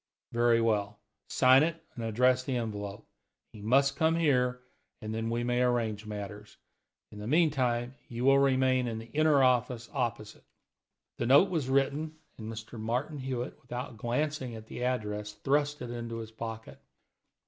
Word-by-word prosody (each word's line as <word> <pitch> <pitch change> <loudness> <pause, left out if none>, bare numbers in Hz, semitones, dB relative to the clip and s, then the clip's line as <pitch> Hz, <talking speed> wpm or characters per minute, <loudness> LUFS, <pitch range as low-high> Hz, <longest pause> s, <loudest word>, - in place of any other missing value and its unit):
Very 120 0 +3
well; 105 -2 0 0.3
sign 130 +1 +6
it, 165 +1 0
and 115 - -6
address 125 +3 +3
the 130 -1 -1
envelope. 105 -3 -5 0.5
He 105 - -11
must 135 +6 +3
come 160 +1 +2
here, 125 -6 +2 0.4
and 110 0 -5
then 115 0 -2
we 120 +1 -1
may 120 0 +1
arrange 115 -4 0
matters. 105 0 -7 0.5
In 105 - -10
the 105 - -6
meantime, 130 -5 +2
you 120 +1 -3
will 135 0 +6
remain 130 -2 +3
in 115 -1 -3
the 115 +1 -9
inner 150 -2 +4
office 125 -2 +1
opposite." 120 -5 -3 0.8
The 120 - 0
note 145 +10 +6
was 155 -7 -1
written, 140 +4 +1 0.2
and 110 0 -6 0.3
Martin 125 +7 -2
Hewitt, 130 -1 -4
without 125 -1 -6
glancing 125 +1 -2
at 110 -1 -9
the 120 - -6
address, 105 -4 -2
thrust 145 +5 0
it 120 - -6
into 115 -1 -5
his 110 -1 -7
pocket. 110 0 -7
120 Hz, 160 wpm, -30 LUFS, 110-135 Hz, 0.8 s, sign